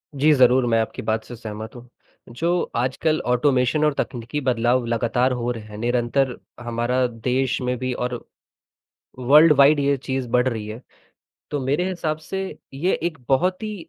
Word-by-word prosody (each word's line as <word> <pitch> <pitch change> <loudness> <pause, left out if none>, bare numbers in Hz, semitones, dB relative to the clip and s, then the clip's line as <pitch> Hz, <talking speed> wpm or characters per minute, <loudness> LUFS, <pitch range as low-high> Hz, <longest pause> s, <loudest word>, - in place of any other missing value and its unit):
जी, 145 +3 +4
ज़रूर 130 -1 +4
मैं 115 -1 +2
आपकी 110 - -5
बात 110 0 -1
से 120 - -9
सहमत 110 0 -8
हूँ, 120 0 -12 0.4
जो 170 +9 0
आजकल 130 +6 0
ऑटोमेशन 125 +3 +2
और 150 - +2
तकनीकी 125 +1 -4
बदलाव 125 -1 +1
लगातार 120 +2 +1
हो 125 -1 -2
रहे 115 -3 -6
हैं, 105 -1 -11
निरंतर 120 +3 0 0.2
हमारा 120 +2 0
देश 125 +3 -1
में 125 0 -1
भी 130 +1 -3
और 125 -1 -4 1.0
वर्ल्ड 150 +5 +6
वाइड 140 +2 +6
ये 140 0 +2
चीज़ 130 -1 -3
बढ़ 125 +2 +2
रही 110 -4 -3
है। 110 +3 -7 0.7
तो 145 - -2
मेरे 145 +8 0
हिसाब 160 -4 -2
से 190 +5 -5 0.3
ये 175 +7 0
एक 165 -2 -2
बहुत 180 +9 +1
ही 205 -6 -6
125 Hz, 170 wpm, -22 LUFS, 120-145 Hz, 1.0 s, वर्ल्ड